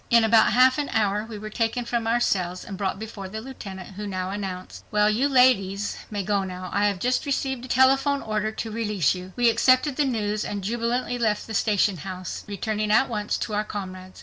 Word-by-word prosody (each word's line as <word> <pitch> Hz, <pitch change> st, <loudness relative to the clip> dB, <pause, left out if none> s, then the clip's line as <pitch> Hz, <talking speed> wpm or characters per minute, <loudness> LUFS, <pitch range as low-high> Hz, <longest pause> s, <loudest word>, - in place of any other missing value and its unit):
In 235 Hz, -1 st, +6 dB
about 225 Hz, 0 st, +5 dB
half 255 Hz, +3 st, +5 dB
an 290 Hz, -, -2 dB
hour 210 Hz, -1 st, +1 dB
we 220 Hz, -, -6 dB
were 215 Hz, +1 st, -7 dB
taken 235 Hz, +2 st, -1 dB
from 235 Hz, -1 st, -1 dB
our 235 Hz, +1 st, +2 dB
cells 180 Hz, -5 st, -1 dB
and 195 Hz, -, -6 dB
brought 190 Hz, 0 st, -2 dB
before 205 Hz, -2 st, -7 dB
the 220 Hz, +3 st, -5 dB
Lieutenant, 200 Hz, -7 st, -8 dB
who 205 Hz, +2 st, -7 dB
now 185 Hz, -1 st, -3 dB
announced, 190 Hz, -2 st, -6 dB
"Well, 210 Hz, 0 st, +3 dB
you 255 Hz, +7 st, +1 dB
ladies 210 Hz, -7 st, +3 dB
may 205 Hz, -2 st, -3 dB
go 200 Hz, 0 st, 0 dB
now,—I 185 Hz, +2 st, -1 dB
have 200 Hz, -2 st, -1 dB
just 250 Hz, +7 st, 0 dB
received 265 Hz, -2 st, -1 dB
a -, -, -9 dB
telephone 270 Hz, +3 st, +3 dB
order 215 Hz, 0 st, -1 dB
to 220 Hz, 0 st, -5 dB
release 210 Hz, -8 st, +1 dB
you." 185 Hz, 0 st, -8 dB
We 245 Hz, -1 st, +3 dB
accepted 255 Hz, +4 st, +3 dB
the 295 Hz, -, +3 dB
news 215 Hz, -4 st, -1 dB
and 200 Hz, -2 st, -4 dB
jubilantly 240 Hz, +3 st, -1 dB
left 215 Hz, -3 st, 0 dB
the 220 Hz, -, -7 dB
station 205 Hz, -2 st, +2 dB
house, 185 Hz, +2 st, -6 dB
returning 210 Hz, +1 st, -2 dB
at 220 Hz, +5 st, +4 dB
once 210 Hz, -3 st, -2 dB
to 220 Hz, -, -4 dB
our 210 Hz, +1 st, +1 dB
comrades. 185 Hz, -3 st, -7 dB
215 Hz, 210 wpm, -25 LUFS, 195-240 Hz, -, In